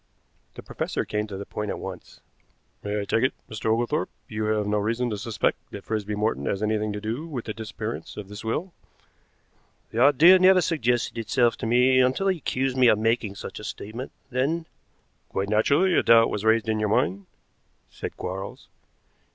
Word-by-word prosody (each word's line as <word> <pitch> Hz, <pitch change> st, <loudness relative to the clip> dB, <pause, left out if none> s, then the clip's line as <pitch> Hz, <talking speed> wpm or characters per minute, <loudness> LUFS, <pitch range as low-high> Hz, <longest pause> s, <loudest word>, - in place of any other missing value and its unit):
The -, -, -9 dB
professor -, -, -3 dB
came 105 Hz, 0 st, -2 dB
to 100 Hz, -2 st, -6 dB
the 100 Hz, -, -6 dB
point 105 Hz, +1 st, -4 dB
at -, -, -3 dB
once. -, -, -9 dB, 0.6 s
"May 105 Hz, 0 st, -2 dB
I -, -, -4 dB
take 115 Hz, -, +1 dB
it, 130 Hz, -, +1 dB
Mr. 110 Hz, +1 st, -5 dB
Oglethorpe, 120 Hz, +7 st, 0 dB, 0.2 s
you 110 Hz, 0 st, -3 dB
have 105 Hz, -1 st, +1 dB
no 105 Hz, 0 st, +1 dB
reason 115 Hz, +3 st, -1 dB
to 105 Hz, -, -2 dB
suspect 110 Hz, 0 st, -1 dB
that -, -, -8 dB
Frisby 105 Hz, -1 st, -3 dB
Morton 105 Hz, -9 st, -1 dB
has 100 Hz, -, -1 dB
had 105 Hz, 0 st, +1 dB
anything 110 Hz, -1 st, 0 dB
to 105 Hz, -, -4 dB
do 115 Hz, +9 st, -4 dB
with 135 Hz, -8 st, -5 dB
the 110 Hz, -, -4 dB
disappearance 110 Hz, +1 st, -6 dB
of 105 Hz, -2 st, -6 dB
this 105 Hz, +2 st, -9 dB
will?" 160 Hz, +11 st, -3 dB, 1.2 s
"The 115 Hz, -, -3 dB
idea 150 Hz, +7 st, +7 dB
never 185 Hz, 0 st, +6 dB
suggested 125 Hz, -9 st, 0 dB
itself 115 Hz, +1 st, +2 dB
to -, -, -4 dB
me 125 Hz, +2 st, +4 dB
until 130 Hz, +10 st, +2 dB
he 185 Hz, -, +1 dB
accused 130 Hz, -1 st, -1 dB
me 130 Hz, -1 st, +6 dB
of 110 Hz, -, +5 dB
making 115 Hz, -2 st, 0 dB
such -, -, -7 dB
a -, -, -10 dB
statement, 115 Hz, +6 st, -6 dB, 0.2 s
then 145 Hz, +7 st, 0 dB, 0.3 s
" -, -, -43 dB
"Quite 100 Hz, +1 st, -2 dB
naturally 140 Hz, -, +3 dB
a -, -, +4 dB
doubt 115 Hz, 0 st, +5 dB
was 105 Hz, -, -3 dB
raised 110 Hz, +1 st, +3 dB
in 110 Hz, -1 st, 0 dB
your 105 Hz, -1 st, 0 dB
mind," 100 Hz, -2 st, 0 dB, 0.6 s
said -, -, -7 dB
Quarles. 95 Hz, +2 st, -6 dB
110 Hz, 195 wpm, -25 LUFS, 105-130 Hz, 1.2 s, idea